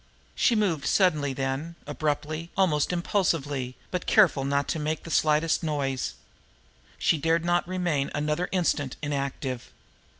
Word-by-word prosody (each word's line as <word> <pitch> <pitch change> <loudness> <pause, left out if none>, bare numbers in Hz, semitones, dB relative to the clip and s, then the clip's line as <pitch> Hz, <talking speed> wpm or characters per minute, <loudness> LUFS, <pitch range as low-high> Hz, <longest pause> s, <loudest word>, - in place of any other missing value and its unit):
She 235 - +3
moved 190 -9 +1
suddenly 155 -8 +3
then, 135 +5 -3
abruptly, 155 +2 -2
almost 160 -6 +2
impulsively, 145 -8 0 0.2
but 180 -2 -3
careful 175 -10 +5
not 140 +1 0
to 160 - -1
make 155 +1 -2
the 165 - -8
slightest 155 +2 +2
noise. 140 -5 -2 0.8
She 160 - +2
dared 165 +2 +1
not 175 0 +1
remain 175 -6 0
another 150 +4 -1
instant 160 -7 0
inactive. 140 -3 -3
155 Hz, 130 wpm, -27 LUFS, 140-170 Hz, 0.8 s, careful